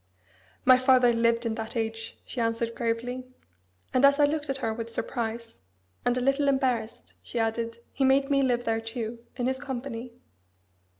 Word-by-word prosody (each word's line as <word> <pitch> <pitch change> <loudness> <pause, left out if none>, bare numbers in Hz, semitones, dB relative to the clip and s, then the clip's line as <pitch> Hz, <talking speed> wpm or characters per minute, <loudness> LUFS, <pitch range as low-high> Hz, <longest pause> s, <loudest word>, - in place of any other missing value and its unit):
"My 255 0 +7
father 255 -2 +5
lived 230 0 +2
in 230 - 0
that 220 +1 -5
age," 225 0 -3
she 245 - -3
answered 230 0 0
gravely. 240 +2 -2 0.7
And 255 +1 +3
as 280 +1 +6
I 290 - +7
looked 295 0 -2
at 270 - 0
her 225 -4 -1
with 230 0 -5
surprise, 230 0 -4 0.4
and 245 0 +1
a - - 0
little 275 +2 +2
embarrassed, 260 -5 0
she - - -7
added, 230 0 -1 0.2
"He 275 - 0
made 275 +1 +3
me 275 0 +4
live 245 -2 +1
there 225 -1 0
too, 230 0 -5
in 245 - -2
his 260 +1 0
company." 250 -3 -5
240 Hz, 175 wpm, -27 LUFS, 230-265 Hz, 0.7 s, My